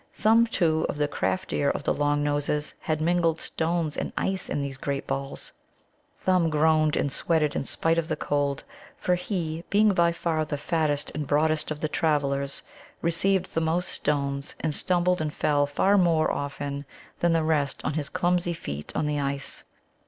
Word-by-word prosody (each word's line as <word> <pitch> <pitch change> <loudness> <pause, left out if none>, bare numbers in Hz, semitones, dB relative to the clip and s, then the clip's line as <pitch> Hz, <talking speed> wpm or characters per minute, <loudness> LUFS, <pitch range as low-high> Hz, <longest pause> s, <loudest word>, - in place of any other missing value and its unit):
Some, 225 +2 +4
too, 160 -7 +1
of - - -3
the 150 0 +1
craftier 145 -2 -1
of - - -2
the - - +1
Long 145 0 +1
noses 145 0 0
had 155 -3 -2
mingled 170 0 +2
stones 165 -2 -1
and - - -3
ice 190 -1 -1
in 145 - -1
these 135 -1 -5
great 140 0 -2
balls. 135 0 -4 0.7
Thumb 180 -3 +2
groaned 155 0 +3
and 140 - 0
sweated 155 -2 +1
in - - 0
spite 165 +4 +1
of 165 - -3
the 160 - -1
cold, 145 -2 -1 0.3
for 180 - +1
he, 170 -3 -2
being 210 +1 +4
by 170 -2 +3
far 165 -2 -1
the 150 -1 -3
fattest 150 -1 0
and 150 -2 -3
broadest 155 +1 +2
of 150 -1 -4
the 155 - +1
travellers, 140 -3 0 0.4
received 180 +3 +1
the 165 - +1
most 165 +3 0
stones, 140 -1 -2
and 155 -2 -1
stumbled 180 +1 +1
and 150 -1 -3
fell 145 -1 +2
far 195 +8 +3
more 165 -3 +3
often 140 0 -4 0.3
than 170 -1 +3
the 165 -1 +2
rest 150 -3 +1
on - - 0
his 150 -1 -3
clumsy 175 0 +1
feet 75 - -6
on - - 0
the 150 0 0
ice. 140 0 -3
155 Hz, 180 wpm, -26 LUFS, 145-170 Hz, 0.7 s, Some